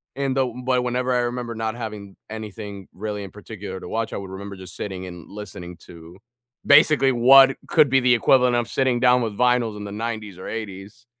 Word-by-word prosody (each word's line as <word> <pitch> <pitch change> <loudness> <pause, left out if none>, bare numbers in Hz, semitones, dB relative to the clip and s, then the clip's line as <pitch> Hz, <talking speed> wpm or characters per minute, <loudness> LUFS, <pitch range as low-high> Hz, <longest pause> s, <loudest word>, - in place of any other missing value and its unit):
And 135 -1 -1
though 130 -3 0
but 125 -1 +2
whenever 125 +1 -1
I 125 - +2
remember 120 -1 -3
not 110 0 -3
having 105 -4 -7
anything 105 -3 -8
really 105 +1 -5
in 95 - -9
particular 100 -2 -8
to - - -9
watch, 115 +2 -3
I - - -3
would 95 -1 -7
remember 100 +1 -8
just 95 -1 -11
sitting 95 -2 -5
and 90 -2 -10
listening 90 -4 -9
to 85 +1 -13 0.5
basically 145 -1 +5
what 135 +2 +7
could 155 -4 +4
be 135 +1 +4
the 125 -1 +4
equivalent 125 +1 +3
of 120 -1 0
sitting 130 -1 0
down 125 0 +4
with 110 -2 -2
Vinyls 125 -3 +2
in 105 - -7
the 100 - -7
90s 110 -3 -5
or 95 - -9
80s, 105 +1 -7
110 Hz, 205 wpm, -23 LUFS, 100-125 Hz, 0.5 s, what